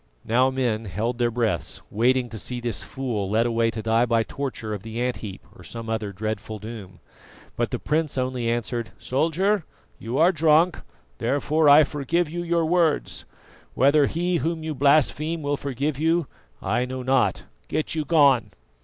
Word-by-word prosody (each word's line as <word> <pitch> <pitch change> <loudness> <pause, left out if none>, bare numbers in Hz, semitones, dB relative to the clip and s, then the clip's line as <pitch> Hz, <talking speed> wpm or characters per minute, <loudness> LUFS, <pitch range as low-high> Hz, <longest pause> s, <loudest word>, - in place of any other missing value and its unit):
Now 125 +3 +3
men 120 -4 -1
held 110 +6 -3
their 120 -1 +2
breaths, 115 -7 -1
waiting 125 +3 +2
to 110 -1 -6
see 125 +3 -3
this 120 -3 -2
fool 120 -8 -3
led 110 +3 +2
away 115 -1 +1
to 110 -1 -5
die 115 +2 +2
by 115 -1 +2
torture 120 -4 -5
of 105 - -5
the 110 +2 -6
ant 125 0 -1
heap 100 -3 -8
or 90 - -14
some 115 +5 -6
other 110 -2 -2
dreadful 110 +2 -4
doom. 105 -4 -9 0.6
But - - -1
the - - -2
prince 155 -2 -1
only 125 -2 -1
answered: 120 0 -2
"Soldier, 170 +8 0 0.4
you 115 +4 -4
are 170 +3 +5
drunk, 160 +1 +3 0.4
therefore 145 +5 +2
I 145 +2 +9
forgive 150 +3 -1
you 175 +1 -3
your 170 -1 +1
words. 165 -2 +1 0.5
Whether 140 +2 +4
He 175 +2 0
Whom 160 0 -2
you 160 -1 -3
blaspheme 150 +3 +2
will 145 0 0
forgive 140 +1 -3
you, 165 +1 +2 0.4
I 110 +6 +1
know 130 0 -5
not. 130 0 +1 0.2
Get 155 - -1
you 155 -1 0
gone!" 140 -7 +4
130 Hz, 170 wpm, -24 LUFS, 115-155 Hz, 0.6 s, I